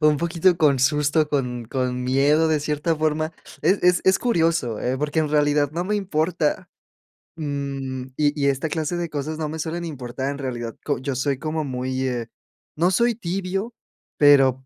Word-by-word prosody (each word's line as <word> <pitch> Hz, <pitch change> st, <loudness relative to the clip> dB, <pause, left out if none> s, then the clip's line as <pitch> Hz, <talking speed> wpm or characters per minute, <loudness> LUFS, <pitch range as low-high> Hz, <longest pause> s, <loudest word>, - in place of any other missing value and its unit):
un 150 Hz, -1 st, +4 dB
poquito 170 Hz, +2 st, +2 dB
con 145 Hz, -5 st, +4 dB
susto 150 Hz, +2 st, +2 dB
con 125 Hz, -5 st, -2 dB
con 125 Hz, 0 st, -2 dB
miedo 145 Hz, +5 st, +3 dB
de 155 Hz, -, +2 dB
cierta 150 Hz, +2 st, -1 dB
forma, 155 Hz, +1 st, 0 dB, 0.3 s
es 195 Hz, -, +3 dB
es 180 Hz, 0 st, +4 dB
es 190 Hz, 0 st, +4 dB
curioso, 165 Hz, -, +1 dB
eh, 130 Hz, +2 st, -1 dB
porque 150 Hz, +2 st, 0 dB
en 155 Hz, -, 0 dB
realidad 145 Hz, -1 st, +2 dB
no 175 Hz, +2 st, -2 dB
me 210 Hz, +3 st, -1 dB
importa. 165 Hz, -4 st, -1 dB, 0.7 s
Mm, 140 Hz, -4 st, -4 dB
y 145 Hz, 0 st, +2 dB
y 140 Hz, -, +3 dB
esta 140 Hz, +3 st, 0 dB
clase 160 Hz, +2 st, -2 dB
de 170 Hz, -1 st, -3 dB
cosas 150 Hz, +1 st, -4 dB
no 155 Hz, -1 st, -3 dB
me 160 Hz, +1 st, -5 dB
suelen 165 Hz, +2 st, -3 dB
importar 130 Hz, -3 st, -4 dB
en 140 Hz, -, -5 dB
realidad, 120 Hz, -5 st, -4 dB
co -, -, 0 dB
yo 135 Hz, +1 st, -3 dB
soy 135 Hz, +1 st, 0 dB
como 155 Hz, +3 st, -2 dB
muy, 130 Hz, 0 st, -2 dB
eh, 120 Hz, -2 st, -3 dB, 0.5 s
no 175 Hz, +3 st, +3 dB
soy 235 Hz, +5 st, +2 dB
tibio, 195 Hz, +2 st, -3 dB, 0.4 s
pero 135 Hz, -3 st, +5 dB
150 Hz, 180 wpm, -23 LUFS, 135-165 Hz, 0.7 s, pero